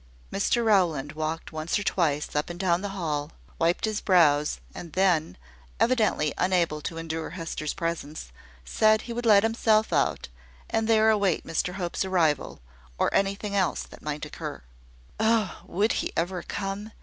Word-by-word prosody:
Mr 230 Hz, +4 st, +1 dB
Rowland 170 Hz, -10 st, +2 dB
walked 155 Hz, +1 st, -4 dB
once 155 Hz, +3 st, -1 dB
or 205 Hz, -, -2 dB
twice 150 Hz, -8 st, 0 dB
up 150 Hz, +3 st, 0 dB
and 175 Hz, 0 st, -7 dB
down 180 Hz, -2 st, +2 dB
the 205 Hz, -, -3 dB
hall, 150 Hz, -3 st, -2 dB, 0.3 s
wiped 170 Hz, +5 st, +2 dB
his 215 Hz, -1 st, -2 dB
brows, 150 Hz, -6 st, +3 dB
and 170 Hz, -3 st, -9 dB
then, 175 Hz, -, +2 dB, 0.4 s
evidently 215 Hz, -, +2 dB
unable 175 Hz, -4 st, +1 dB
to 165 Hz, -, -5 dB
endure 165 Hz, 0 st, -4 dB
Hester's 165 Hz, -3 st, -4 dB
presence, 160 Hz, -, -4 dB, 0.3 s
said 215 Hz, -, +3 dB
he 235 Hz, -, -6 dB
would 240 Hz, 0 st, -2 dB
let 205 Hz, -2 st, +7 dB
himself 220 Hz, -1 st, +2 dB
out, -, -, +1 dB, 0.4 s
and 225 Hz, 0 st, +1 dB
there 220 Hz, -1 st, +5 dB
await 200 Hz, -5 st, +1 dB
Mr 180 Hz, +3 st, -1 dB
Hope's 180 Hz, -2 st, -2 dB
arrival, 165 Hz, -, 0 dB, 0.4 s
or -, -, +1 dB
anything 200 Hz, +1 st, 0 dB
else 190 Hz, -3 st, +1 dB
that -, -, -14 dB
might 150 Hz, 0 st, -4 dB
occur. 150 Hz, -, -7 dB, 0.6 s
Oh! 220 Hz, -3 st, +1 dB
would 205 Hz, +5 st, +1 dB
he -, -, -2 dB
ever 175 Hz, +2 st, -1 dB
come? 200 Hz, +2 st, -5 dB
180 Hz, 160 wpm, -26 LUFS, 155-205 Hz, 0.6 s, let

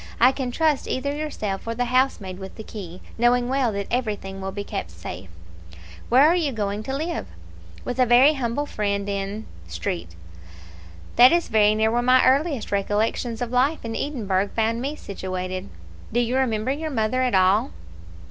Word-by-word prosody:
I 250 Hz, +2 st, +7 dB
can 265 Hz, -2 st, -3 dB
trust 305 Hz, +2 st, +1 dB
either 280 Hz, +2 st, -2 dB
yourself 220 Hz, -10 st, -4 dB
or 230 Hz, -, -2 dB
the 245 Hz, +1 st, 0 dB
housemaid 240 Hz, -7 st, 0 dB
with 190 Hz, 0 st, -9 dB
the 220 Hz, -, -8 dB
key, 185 Hz, -5 st, -9 dB, 0.2 s
knowing 240 Hz, +1 st, +3 dB
well 260 Hz, -2 st, +1 dB
that 200 Hz, 0 st, -3 dB
everything 205 Hz, -5 st, -2 dB
will 190 Hz, 0 st, -4 dB
be 200 Hz, +1 st, -5 dB
kept 85 Hz, -, -5 dB
safe." 85 Hz, +2 st, -8 dB, 0.8 s
"Where 255 Hz, +4 st, +6 dB
are 330 Hz, +3 st, +5 dB
you 320 Hz, -6 st, 0 dB
going 205 Hz, -3 st, -2 dB
to 265 Hz, +5 st, -4 dB
live?" 330 Hz, +3 st, -3 dB, 0.6 s
"With 250 Hz, +1 st, -4 dB
a 255 Hz, -, +4 dB
very 255 Hz, +5 st, +6 dB
humble 270 Hz, +1 st, -2 dB
friend 200 Hz, -5 st, -2 dB
in 200 Hz, +2 st, -3 dB, 0.2 s
Street." 85 Hz, 0 st, -4 dB, 1.0 s
"That 250 Hz, +2 st, +9 dB
is 345 Hz, 0 st, +1 dB
very 215 Hz, -1 st, +4 dB
near 220 Hz, +1 st, +2 dB
where 240 Hz, +1 st, +1 dB
my 255 Hz, +1 st, +5 dB
earliest 275 Hz, -1 st, +2 dB
recollections 215 Hz, +4 st, -1 dB
of 240 Hz, -, -5 dB
life 260 Hz, +3 st, +1 dB
in 225 Hz, 0 st, -4 dB
Edinburgh 205 Hz, -9 st, -1 dB
found 230 Hz, +1 st, +1 dB
me 280 Hz, +4 st, -3 dB
situated." 185 Hz, -, -5 dB, 0.4 s
"Do 240 Hz, -, +1 dB
you 240 Hz, +1 st, 0 dB
remember 250 Hz, -2 st, +1 dB
your 310 Hz, +3 st, -3 dB
mother 255 Hz, -1 st, 0 dB
at 250 Hz, -4 st, +1 dB
all?" 195 Hz, +7 st, +4 dB
230 Hz, 175 wpm, -24 LUFS, 200-260 Hz, 1.0 s, That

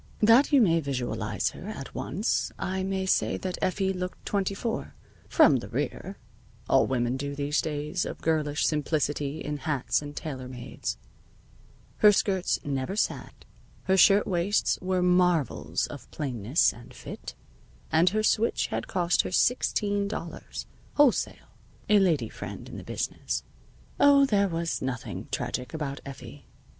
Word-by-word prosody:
That 230 Hz, +8 st, +6 dB
you 280 Hz, -3 st, +6 dB
may 165 Hz, -6 st, +4 dB
visualize 135 Hz, -5 st, -2 dB
her -, -, -9 dB
at -, -, -7 dB
once -, -, -1 dB
I 190 Hz, +1 st, -2 dB
may 190 Hz, 0 st, -1 dB
say 190 Hz, -, +1 dB
that 185 Hz, -1 st, -4 dB
Effie 190 Hz, +1 st, 0 dB
looked 180 Hz, 0 st, -6 dB
twenty 200 Hz, -1 st, -1 dB
four 225 Hz, +2 st, -4 dB, 0.3 s
from -, -, +6 dB
the -, -, -6 dB
rear 195 Hz, -, -3 dB, 0.5 s
(all 135 Hz, -, +4 dB
women 125 Hz, -1 st, 0 dB
do 140 Hz, +1 st, -3 dB
in 140 Hz, -, -5 dB
these 145 Hz, +1 st, 0 dB
days 150 Hz, +3 st, -2 dB
of -, -, -6 dB
girlish 150 Hz, -2 st, 0 dB
simplicity 150 Hz, -1 st, -1 dB
in 150 Hz, 0 st, -3 dB
hats 140 Hz, -2 st, 0 dB
and 145 Hz, 0 st, -8 dB
tailor 130 Hz, -5 st, -5 dB
mades); 125 Hz, -1 st, -5 dB, 1.0 s
her 210 Hz, -, +7 dB
skirts 190 Hz, -2 st, +1 dB
never 140 Hz, +5 st, -2 dB
sagged, 215 Hz, -, -3 dB, 0.4 s
her 190 Hz, -, +2 dB
shirtwaists 195 Hz, 0 st, +3 dB
were 185 Hz, -1 st, 0 dB
marvels 180 Hz, -4 st, +2 dB
of -, -, -10 dB
plainness 130 Hz, -1 st, +1 dB
and 120 Hz, +1 st, -14 dB
fit, -, -, -8 dB, 0.6 s
and 165 Hz, +3 st, +5 dB
her 215 Hz, +3 st, 0 dB
switch 220 Hz, +1 st, +2 dB
had -, -, -2 dB
cost 175 Hz, -2 st, +2 dB
her -, -, -5 dB
sixteen 205 Hz, -2 st, +1 dB
dollars, 175 Hz, -5 st, -6 dB, 0.3 s
wholesale 290 Hz, -4 st, +2 dB, 0.4 s
(a 210 Hz, -1 st, +6 dB
lady 160 Hz, -, +2 dB
friend -, -, -8 dB
in -, -, -8 dB
the -, -, -8 dB
business). -, -, -3 dB, 0.6 s
Oh, 280 Hz, -1 st, +7 dB
there 200 Hz, -6 st, +2 dB
was 165 Hz, -1 st, -2 dB
nothing 130 Hz, -3 st, -4 dB
tragic 125 Hz, +5 st, -3 dB
about 140 Hz, -3 st, -4 dB
Effie. 135 Hz, 0 st, -10 dB
170 Hz, 150 wpm, -27 LUFS, 140-195 Hz, 1.0 s, her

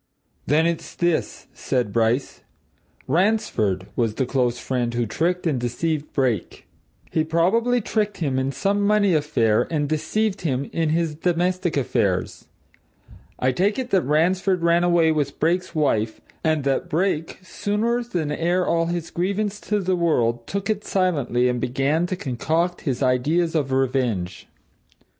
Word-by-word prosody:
"Then, 155 Hz, +4 st, +3 dB
it's 170 Hz, -1 st, -2 dB
this," 175 Hz, -2 st, -1 dB
said 125 Hz, -6 st, -2 dB
Bryce. 115 Hz, +3 st, 0 dB, 0.7 s
"Ransford 130 Hz, -, +1 dB
was 115 Hz, -3 st, 0 dB
the 130 Hz, -, 0 dB
close 125 Hz, -2 st, 0 dB
friend 120 Hz, -2 st, -2 dB
who 120 Hz, 0 st, +1 dB
tricked 175 Hz, -, -1 dB
and 150 Hz, -6 st, +1 dB
deceived 150 Hz, +5 st, -2 dB
Brake: 125 Hz, -, -1 dB, 0.5 s
"He 160 Hz, -, +1 dB
probably 210 Hz, +10 st, +2 dB
tricked 210 Hz, -1 st, -1 dB
him 135 Hz, -6 st, -1 dB
in 130 Hz, +1 st, -1 dB
some 195 Hz, +10 st, 0 dB
money 205 Hz, -2 st, +3 dB
affair, 115 Hz, -8 st, +2 dB
and 150 Hz, -3 st, 0 dB
deceived 190 Hz, +8 st, -1 dB
him 140 Hz, -5 st, -1 dB
in 165 Hz, -2 st, 0 dB
his 165 Hz, 0 st, 0 dB
domestic 175 Hz, +1 st, 0 dB
affairs. 105 Hz, -8 st, -1 dB, 0.9 s
I 130 Hz, -, +1 dB
take 195 Hz, +10 st, +1 dB
it 255 Hz, -2 st, -4 dB
that 190 Hz, -, +4 dB
Ransford 180 Hz, +5 st, +1 dB
ran 170 Hz, +1 st, +3 dB
away 170 Hz, -2 st, +4 dB
with 145 Hz, -3 st, -2 dB
Brake's 175 Hz, +3 st, 0 dB
wife, 115 Hz, -8 st, 0 dB, 0.2 s
and 155 Hz, -2 st, +1 dB
that 135 Hz, -1 st, 0 dB
Brake, 165 Hz, -1 st, -1 dB
sooner 220 Hz, +5 st, -1 dB
than 175 Hz, -10 st, -3 dB
air 175 Hz, +4 st, +1 dB
all 165 Hz, 0 st, +1 dB
his 170 Hz, -1 st, -3 dB
grievance 200 Hz, +3 st, -1 dB
to 210 Hz, 0 st, -1 dB
the 185 Hz, -1 st, 0 dB
world, 120 Hz, -9 st, +1 dB
took 200 Hz, 0 st, -3 dB
it 210 Hz, -1 st, -1 dB
silently 145 Hz, -10 st, +1 dB
and 125 Hz, -1 st, -1 dB
began 135 Hz, +7 st, 0 dB
to 185 Hz, -, -2 dB
concoct 165 Hz, +3 st, -1 dB
his 130 Hz, +1 st, -1 dB
ideas 150 Hz, +7 st, +1 dB
of 145 Hz, -5 st, 0 dB
revenge. 125 Hz, -9 st, -1 dB
160 Hz, 150 wpm, -23 LUFS, 130-180 Hz, 0.9 s, that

